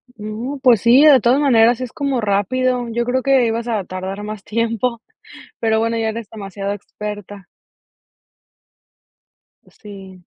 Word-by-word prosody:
No, 225 +6 -6
pues 240 -6 +5
sí, 245 +5 +6
de 280 -4 +7
todas 245 +4 +2
maneras 240 -3 +4
es 250 - -5
como 275 -4 -2
rápido. 245 +5 0
Yo 235 +1 -1
creo 255 +1 0
que 270 -3 +3
ibas 230 +1 -2
a 215 -5 -1
tardar 190 +3 -6
más 210 -1 -7
tiempo. 230 +1 -2 0.6
Pero 220 -1 +1
bueno, 230 +1 -1
ya 225 -1 -1
eres 225 -1 -6
demasiado 200 -1 -5
experta. 205 -1 -8 2.2
Pues, - - -25
sí. 190 -3 -12
225 Hz, 145 wpm, -19 LUFS, 205-245 Hz, 2.2 s, de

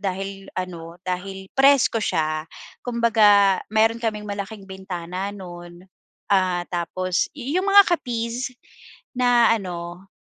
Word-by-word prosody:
dahil 195 0 -4
ano 170 -2 -6
dahil 190 +1 -4
presko 270 -4 +4
siya. 155 -4 -1 0.3
Kumbaga 210 -5 +4
mayroon 225 +2 +2
kaming 215 -2 -2
malaking 205 0 -6
bintana, 190 -1 -5
noon, 175 -2 -10 0.5
ah, 185 -2 +2
tapos 180 +1 -1
iyong 320 +9 -1
mga 400 0 +8
kapis 245 +1 -4 0.6
na 245 -2 +4
ano 175 -3 -5
195 Hz, 105 wpm, -23 LUFS, 180-230 Hz, 0.6 s, mga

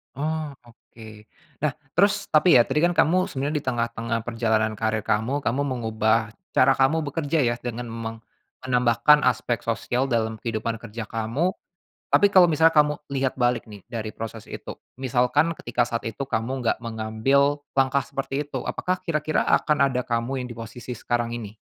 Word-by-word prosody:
Oh 155 0 -3
oke. 110 -2 -15 0.3
Nah 150 -1 -1 0.2
terus 200 +3 +2
tapi 160 +3 +5
ya, 120 - +8
tadi 150 - -1
kan 175 +2 +2
kamu 185 +4 +3
sebenarnya 145 -2 -2
di - - -16
tengah-tengah 115 -2 -1
perjalanan 110 -2 0
karir 110 -1 0
kamu, 125 +9 0
kamu 130 +5 0
mengubah 110 -3 0 0.2
cara 135 - +6
kamu 135 +5 +2
bekerja 150 +1 0
ya, 120 -1 +1
dengan 120 -1 -5
meng 115 0 -5 0.5
menambahkan 125 +4 +4
aspek 120 -2 0
sosial 120 +3 -1
dalam 110 -2 -1
kehidupan 115 0 -3
kerja 115 +1 -6
kamu, 115 - -1 0.6
tapi 205 - +6
kalau 185 -3 +8
misalnya 160 +1 +5
kamu 150 -1 +4 0.2
lihat 135 -1 0
balik 120 -1 +1
nih, 105 -2 -11
dari 110 -3 -4
proses 115 -1 -7
itu, - - -7 0.2
misalkan 130 +4 +2
ketika 120 0 0
saat 115 -1 -4
itu 115 +5 -6
kamu 130 +1 -2
nggak - - +1
mengambil 115 +6 +1 0.2
langkah 135 +1 +3
seperti 135 +1 -3
itu, - - -4
apakah 185 0 -1
kira-kira 155 -2 0
akan 145 -3 +3
ada 125 - 0
kamu 120 +3 -1
yang - - -9
di 120 - -8
posisi 115 +2 -7
sekarang 120 0 -2
ini? 110 -2 -8
125 Hz, 165 wpm, -24 LUFS, 115-145 Hz, 0.6 s, ya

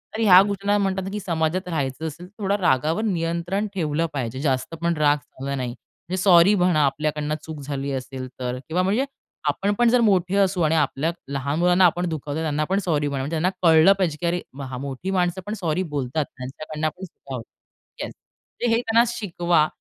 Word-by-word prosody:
तर 225 - -2
ह्या 185 -4 +8
गोष्टींना 200 0 0
म्हणतात, 195 -1 -1
की 210 - -3
समाजात 175 0 -1
राहायचं 155 -1 -2
असेल, 170 +4 -8
तर 205 +3 -17
थोडा 195 +1 +2
रागावर 160 - +1
नियंत्रण 175 +2 -1
ठेवलं 160 -3 0
पाहिजे, 130 -1 -3
जास्त 135 +1 -1
पण 170 0 +2
राग 150 -1 +4
चांगला 140 -1 -6
नाही. 130 -2 -2
म्हणजे 180 +8 -9
सॉरी 180 +1 +7
म्हणा, 180 -6 +3
आपल्याकडून 150 +1 -1
चूक 160 -2 -7
झाली 140 0 -4
असेल 130 0 -5
तर 125 0 -2
किंवा 175 +3 +1
म्हणजे 210 +8 +1 0.4
आपण 200 +8 0
पण 240 - +5
जर 245 0 +4
मोठे 185 -1 +2
असू 190 -2 +2
आणि 160 0 +3
आपल्या 150 +1 +1 0.2
लहान 140 +3 -1
मुलांना 180 +1 +5
आपण 175 +1 +2
दुखावतो, 150 -1 -4
त्यांना 155 -1 0
पण 195 +1 +2
सॉरी 150 -4 +1
म्हणा, 140 -2 -2
म्हणजे 145 - -4
त्यांना 175 +4 +2
कळलं 165 +3 +7
पाहिजे, 170 -6 0
की - - -1
अरे 175 +1 0 0.2
हां 130 -2 -5
मोठी 140 +7 -4
माणसं 180 -1 0
पण 210 - -4
सॉरी 170 +1 0
बोलतात. 140 +2 -1
त्यांच्याकडून 155 +4 -4
पण 180 +5 -14
चुका 135 -6 -10
होतात 115 - -13
येस, - - -6 0.6
हे 235 - +2
त्यांना 230 0 +4
शिकवा, 175 -8 +1
165 Hz, 195 wpm, -23 LUFS, 145-185 Hz, 0.6 s, ह्या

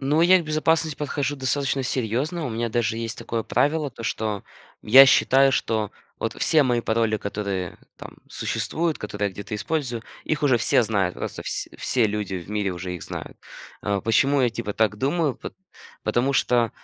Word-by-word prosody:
ну, 145 +3 +2
я 180 +2 +6
к 170 - -5
безопасности 155 0 +1
подхожу 145 -1 -2
достаточно 135 +1 0
серьезно, 130 - -2
у - - -4
меня 115 +1 -2
даже 115 0 0
есть 115 0 -4
такое 115 -1 -3
правило: 145 +2 +1
то, 115 - -11
что 110 -3 -2 0.4
я 135 +5 +9
считаю, 135 +1 +5
что 110 -4 0 0.3
вот - - -3
все 155 -2 +4
мои 120 -2 +1
пароли, 110 -1 +1
которые 100 -3 -4 0.2
там - - -11
существуют, 165 -1 -2
которые 105 -1 -3
я - - -11
где-то 100 +2 -7
использую, 120 +1 -2 0.2
их 155 -1 -2
уже 130 -5 +4
все 115 - +3
знают, 100 -5 0
просто - - -6
вс - - -4
все 120 -3 +1
люди 105 -2 -3
в 90 +2 -6
мире 105 -2 -1
уже 90 +1 -5
их 90 - -7
знают. - - -7 0.5
А, 100 -1 0
почему 135 +7 +2
я 120 - +3
типа 110 -2 -4
так 110 -1 +1
думаю? 145 +2 0
Пот - - -8 0.5
потому 130 +3 +1
что, 120 -3 +2
120 Hz, 180 wpm, -24 LUFS, 105-140 Hz, 0.5 s, я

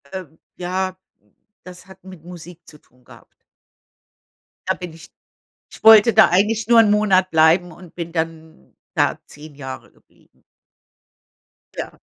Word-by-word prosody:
Ähm, 175 -4 -10 0.2
ja, 185 +1 -4 0.7
das 180 0 -13
hat 190 0 -17
mit 185 -4 -14
Musik 175 0 -13
zu 150 - -16
tun 125 -2 -31
gehabt. - - -18 1.4
Da - - +1
bin 180 -3 -9
ich 165 0 -15 0.7
ich - - -14
wollte 220 +1 +7
da 220 +1 +5
eigentlich 210 +4 0
nur 235 -1 +5
'n 215 -2 +4
Monat 195 -3 +1
bleiben 165 +3 +3
und 175 +1 -16
bin 170 -1 -7
dann 160 -1 -7 0.2
da - - 0
10 150 0 -14
Jahre 130 -2 -9
geblieben. - - -32 1.4
Ja. - - -6
180 Hz, 140 wpm, -19 LUFS, 160-190 Hz, 1.4 s, wollte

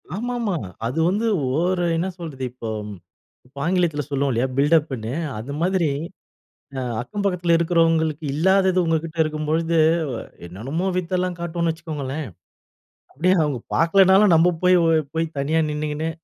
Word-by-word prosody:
ஆமாமா. 235 -2 -2 0.3
அது 130 +7 -3
வந்து 210 +5 0 0.3
ஓரு 175 +1 +1
என்ன 170 +3 -1
சொல்றது? 150 -6 -6
இப்போ 120 -2 -7 0.8
இப்ப 135 +3 -24
ஆங்கிலத்துல 170 -4 +1
சொல்லுவோம் 140 -1 0
இல்லையா? 120 +2 +1
பில்டப்புன்னு. 140 -6 +1 0.3
அது 120 +6 -7
மாதிரி 180 -2 +1 0.9
அ - - -1 0.2
அக்கம் 200 - -5
பக்கத்துல 180 -3 +1
இருக்குறவங்களுக்கு 165 -2 +1
இல்லாதது 190 +3 +3
உங்ககிட்ட 165 0 -1
இருக்கும் 155 -1 -3
பொழுது, 165 +1 +1 0.7
என்னென்னமோ 130 - -4
வித்தைல்லாம் 180 0 -1
காட்டுவோம்ன்னு 170 -1 -1
வச்சுக்கோங்களேன். 155 -3 -5 0.9
அப்படியே 180 +7 +2
அவங்க 145 -4 -1 0.2
பாக்கலன்னாலும் 190 +3 +5
நம்ப 170 +2 +4
போய், 180 0 +5 0.2
இவ் 150 -3 -4
போய் 165 0 +1
தனியா 155 +4 +1
நின்னுகின்னு. 150 +1 -2
165 Hz, 130 wpm, -22 LUFS, 150-180 Hz, 0.9 s, பாக்கலன்னாலும்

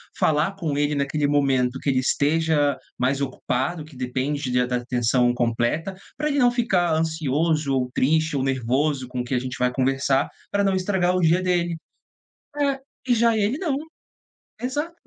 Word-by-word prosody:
falar 155 +3 +2
com 160 -7 -2
ele 145 +1 +1
naquele 145 +1 0
momento 135 -3 +1
que - - -2
ele 130 - +2
esteja 145 +1 +1 0.2
mais 135 +2 +1
ocupado, 140 +3 -2
que 155 -2 -15
depende 130 +2 -2
de 125 0 +3
da 125 - -1
atenção 120 0 +1
completa, 120 +9 -1 0.2
pra 300 - -2
ele 285 - 0
não 245 -3 +5
ficar 195 -8 +1
ansioso 155 -2 0
ou 125 -1 0
triste 155 +3 +2
ou 135 - 0
nervoso 135 +1 0
com 125 0 -4
o - - -3
que 125 - -5
a 125 - +2
gente 130 0 -5
vai 125 0 +1
conversar 135 +1 +1 0.2
pra 200 0 +1
não 195 -1 +2
estragar 185 -1 +1
o - - +2
dia 170 +2 +3
dele. 175 -2 0 0.8
É. 280 -2 +1 0.3
E 250 - +3
já 230 0 +3
ele 215 +5 +1
não 315 -6 -1 0.9
Exato. 290 +7 -2
145 Hz, 175 wpm, -23 LUFS, 130-180 Hz, 0.9 s, não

